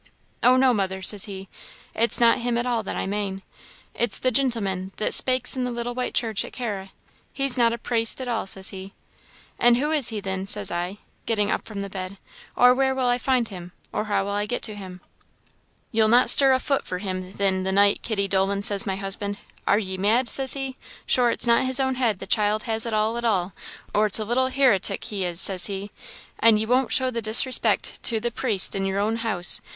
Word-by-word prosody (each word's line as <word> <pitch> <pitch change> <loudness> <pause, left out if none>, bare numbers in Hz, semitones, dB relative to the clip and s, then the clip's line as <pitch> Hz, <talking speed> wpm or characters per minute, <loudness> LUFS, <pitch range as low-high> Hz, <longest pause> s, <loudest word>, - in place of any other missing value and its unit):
'Oh 250 +1 +4
no, 260 -1 +3
mother,' 190 -3 -3
says 205 0 +2
he, 195 -1 -9 0.5
'it's 230 +1 +2
not 235 +1 +4
him 240 0 -2
at 240 - -2
all 240 -2 -1
that 205 - -6
I - - -3
mane 195 -1 -4 0.5
it's 235 -4 0
the 255 - 0
gintleman 200 -8 -1
that 215 - 0
spakes 255 0 +3
in 255 - -2
the 250 - -2
little 240 0 -5
white 250 0 -4
church 220 -4 0
at - - -11
Carra 205 -6 -5 0.4
he's 275 -2 +1
not 235 -2 +2
a 235 - -4
praist 230 0 0
at 260 - -6
all,' 230 -4 -3
says 190 0 -3
he. 190 0 -10 0.6
'An' 240 0 +5
who 290 +5 -1
is 295 -6 +2
he 220 -2 -2
thin?' 190 -1 -5
says 205 -1 0
I, 175 +3 -4 0.3
getting 210 -2 0
up - - -3
from 205 -3 -6
the 200 - -5
bed, 190 0 -8 0.4
'or 250 0 +5
where 265 0 0
will 260 -1 -1
I 245 0 +1
find 250 -3 0
him, 180 -3 -10 0.2
or 210 - -2
how 205 -2 -1
will 200 - -5
I 205 +1 -2
get 245 - -4
to 215 - -2
him?' 185 -3 -10 0.9
'Ye'll 220 -1 +2
not 240 +3 +6
stir 270 -1 +7
a 260 - +3
fut 275 +1 -2
for 180 - -5
him, 185 -1 -6
thin, 195 -2 0
the 190 0 -2
night, 200 +1 +2
Kitty 200 -3 -2
Dolan,' 195 +1 -1
says 200 0 +2
my 190 - -2
husband 200 +1 -4 0.3
'are 205 - +3
ye 190 -3 -4
mad,' 220 +6 +1
says 265 +2 +4
he; 270 -1 -5 0.3
'sure 245 -1 +2
it's - - +1
not 235 +2 +3
his 260 0 +2
own 265 -1 0
head 240 -6 -1
the - - -9
child 210 0 0
has 225 0 -1
at 230 - -4
all 220 +2 -1
at - - -7
all, 190 -5 -1 0.4
or 215 +1 +2
it's 205 - +4
a 215 - -2
little 250 +4 0
hiritic 260 -7 +1
he 200 -3 -4
is,' 175 -1 -1
says 185 -2 +5
he; 200 0 -6 0.5
'an' 225 -1 +5
ye 215 - -1
won't 250 +2 0
show 260 -1 +1
the 230 -1 -4
disrespect 225 +4 +2
to 225 -2 +2
the 240 +2 -3
praist 220 -5 +3
in 195 - -2
yer 195 0 -3
own 215 +3 -1
house.' 215 -6 +1
215 Hz, 230 wpm, -23 LUFS, 195-245 Hz, 0.9 s, stir